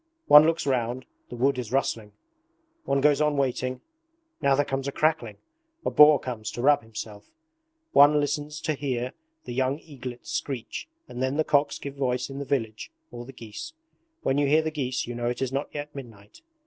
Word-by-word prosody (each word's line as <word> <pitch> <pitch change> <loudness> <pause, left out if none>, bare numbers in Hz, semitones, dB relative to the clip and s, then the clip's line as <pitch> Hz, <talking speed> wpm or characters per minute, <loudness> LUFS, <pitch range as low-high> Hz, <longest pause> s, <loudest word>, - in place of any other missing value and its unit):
One 150 +1 +9
looks 165 -2 0
round 125 -1 -1 0.2
the - - -7
wood 130 +2 +1
is 120 -3 -5
rustling; 115 -6 -1 0.7
one 140 0 +1
goes 145 +1 +4
on 150 -1 +2
waiting, 130 -1 -1 0.6
now 140 -1 +4
there 145 +1 +2
comes 135 0 -3
a - - -1
crackling 155 +2 0 0.5
a - - 0
boar 150 -1 +7
comes 115 -4 -5
to 120 - -4
rub 145 +1 +5
himself; 110 -2 -9 0.6
one 145 +1 +6
listens 145 +1 -2
to 155 - 0
hear 130 -3 -3 0.3
the 120 - -6
young 130 +2 0
eaglets 130 -6 -9
screech 135 - -4 0.2
and 125 - -7
then 130 +2 0
the 155 - +3
cocks 145 -1 +2
give 140 0 -8
voice 125 -1 -1
in 135 - -6
the 140 - -4
village, 115 - -2 0.2
or 120 - -8
the 135 - -10
geese. 120 - -9 0.5
When 135 +2 +1
you 145 - +2
hear 155 +3 +4
the 160 - -2
geese 130 -4 -2
you 120 - -6
know 120 0 -3
it 120 - -3
is 130 -1 -2
not 140 +2 -1
yet 150 0 -6
midnight. 110 -7 -12
135 Hz, 195 wpm, -26 LUFS, 125-145 Hz, 0.7 s, One